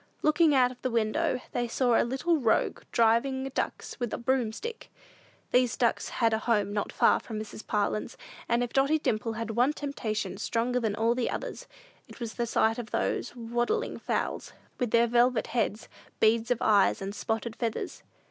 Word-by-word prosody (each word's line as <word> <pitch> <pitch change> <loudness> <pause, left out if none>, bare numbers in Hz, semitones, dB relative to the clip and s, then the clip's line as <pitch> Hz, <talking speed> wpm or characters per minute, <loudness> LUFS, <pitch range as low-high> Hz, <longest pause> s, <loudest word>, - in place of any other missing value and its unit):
Looking 305 -1 +4
out 250 -1 +4
of 250 - -14
the 255 - -1
window, 245 +5 0
they 240 0 -1
saw 245 0 +2
the - - +4
little 270 +8 +1
rogue 230 -4 +1
driving 240 +4 +2
ducks - - -3
with 240 -3 -2
a - - -2
broomstick. 260 - -2 0.6
These 250 -2 +3
ducks 235 -2 +1
had 230 -1 +1
a 220 - +1
home 210 -3 +1
not 205 - -2
far - - +4
from 220 - -7
Mrs. 215 0 -8
Parlin's, 210 0 -1 0.3
and 235 +1 +2
if 240 - -5
Dotty 275 +3 +3
Dimple 225 -6 -1
had 225 0 -4
one 245 +6 +2
temptation 240 -8 -3
stronger 245 +2 0
than 220 -4 -1
all 225 +2 +2 0.2
others, - - -5 0.4
it - - -13
was 230 -3 -5
the 235 -1 -2
sight 225 +1 +2
of 230 -2 -6
those 245 - -1
waddling 240 - -1
fowls, - - -2 0.3
with 245 -3 0
their 235 +1 +4
velvet 240 0 +3
heads, 230 -1 -1 0.3
beads 225 +2 +3
of 245 - +2
eyes, 205 -2 +4
and 195 +1 -5
spotted 225 +1 -3
feathers. 230 -3 -3
235 Hz, 175 wpm, -28 LUFS, 220-255 Hz, 0.6 s, Looking